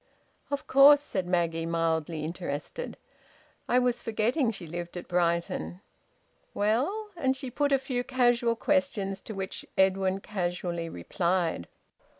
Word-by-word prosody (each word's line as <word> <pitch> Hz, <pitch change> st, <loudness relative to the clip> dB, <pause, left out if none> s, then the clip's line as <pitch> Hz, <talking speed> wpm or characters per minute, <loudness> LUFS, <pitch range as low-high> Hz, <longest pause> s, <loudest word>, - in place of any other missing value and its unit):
"Of 285 Hz, 0 st, -3 dB
course," 280 Hz, +2 st, +8 dB
said 190 Hz, -10 st, -3 dB
Maggie, 165 Hz, -2 st, 0 dB
mildly 165 Hz, -1 st, -1 dB
interested. 165 Hz, -, -5 dB, 0.7 s
"I 245 Hz, -, +4 dB
was 245 Hz, -1 st, +2 dB
forgetting 230 Hz, +4 st, +1 dB
she 195 Hz, -5 st, -5 dB
lived 175 Hz, +2 st, -6 dB
at 175 Hz, -, -7 dB
Brighton. 170 Hz, -, 0 dB, 0.8 s
Well?" 275 Hz, -, 0 dB
and 265 Hz, -5 st, +1 dB
she 260 Hz, -2 st, -5 dB
put 285 Hz, +3 st, 0 dB
a 275 Hz, -, +5 dB
few 255 Hz, -2 st, -2 dB
casual 240 Hz, -2 st, +2 dB
questions, 225 Hz, -8 st, 0 dB
to 220 Hz, -, -7 dB
which 190 Hz, -1 st, -4 dB
Edwin 190 Hz, 0 st, +3 dB
casually 175 Hz, -4 st, -3 dB
replied. 170 Hz, -, -1 dB
195 Hz, 130 wpm, -28 LUFS, 170-250 Hz, 0.8 s, course